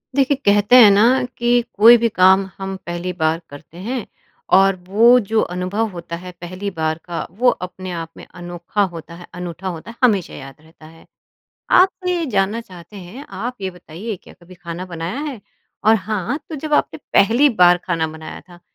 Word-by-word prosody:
देखिए, 275 0 +3
कहते 205 +4 +4
हैं 215 - +9
ना 235 +6 +4
कि 240 0 +2
कोई 230 +4 +8
भी 230 0 +1
काम 190 -1 +4
हम 195 0 -5
पहली 175 +1 -4
बार 160 -1 0
करते 145 +3 -13
हैं 245 -3 -3 0.5
और 195 0 +4
वो 230 +6 +5
जो 220 0 0
अनुभव 190 +5 -1
होता 170 -1 -7
है 180 +2 -9
पहली 185 +3 -5
बार 160 -3 -2
का 170 -2 -4
वो 250 0 +5 0.2
अपने 185 0 -9
आप 165 -2 -5
में - - -11
अनोखा 175 +3 -4
होता 165 +1 -9
है, 175 +1 -12
अनूठा 180 +1 -6
होता 175 +5 -6
है, - - -16
हमेशा 205 -8 +2
याद 135 -1 -10
रहता 160 0 -19
है। 165 +1 -16 0.7
आपने 360 -2 +2
जानना 210 0 0
चाहते 180 -2 -14
हैं 200 +9 -10
आप 245 +4 -4
ये 190 - -3
बताइए 180 +4 -8
क्या - - -16
कभी 185 +2 -15
खाना 175 0 -7
बनाया 170 +8 -5
है? 290 -7 -5 0.4
और 220 +1 +6
हाँ, 215 - -2
तो 320 - -6
जब 300 +2 -6
आपने - - 0 0.2
पहली 235 +8 +5
बार 180 -7 +4
खाना 165 -3 -1
बनाया 160 0 -9
था 175 -1 -16
190 Hz, 185 wpm, -19 LUFS, 175-230 Hz, 0.7 s, हैं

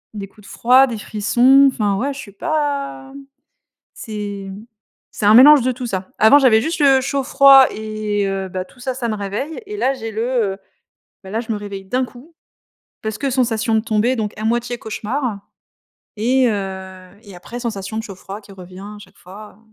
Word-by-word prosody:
des 200 -1 -6
coups 210 0 -19
de - - -12
froid, 255 +3 +4
des 230 -3 -5
frissons, 250 +7 +4
enfin, 205 -3 0
ouais, 275 +5 -2
je 270 - -10
suis 200 - -10
pas, 285 - -3
mmh, 280 - -11 0.7
c'est, 205 -3 -6
mmh, 205 +4 -11 0.5
c'est - - -5
un 210 - +7
mélange 280 +2 +8
de 255 +1 0
tout 250 0 -6
ça. 190 -4 -4
Avant 220 +7 +7
j'avais 235 -5 +4
juste 330 0 -3
le 270 -2 +5
chaud 275 +1 -2
froid, 275 -1 +7
et 215 -1 -3
heu, 195 -1 -3
bah, 185 0 -4
tout 250 - -22
ça, 260 +1 -3
ça 240 -2 -3
me 215 - -1
réveille, 210 - -5
et 420 0 -6
là 270 -5 +1
j'ai 225 -3 -6
le, 220 - -4 0.3
heu - - -15 0.7
bah, 190 - -11
la 220 - -1
je 230 - -6
me - - -3
réveille 200 -2 -8
d'un 255 +6 -1
coup, 265 +7 -16 0.7
parce 220 -1 -4
que 280 - -2
sensation 230 -3 0
de 220 - +3
tomber, 225 +3 0
donc 210 -2 -3
à - - -4
moitié 240 +1 -1
cauchemar, 225 0 -4 0.8
et, 250 +3 +2
heu, 190 -2 -6
et 200 -4 -13
après 235 +7 -9
sensation 220 -3 -5
de - - -3
chaud-froid 195 0 -9
qui 200 - -15
revient 185 -1 -12
à 210 +1 -9
chaque - - -17
fois. 200 +3 -13
220 Hz, 205 wpm, -19 LUFS, 205-260 Hz, 0.8 s, mélange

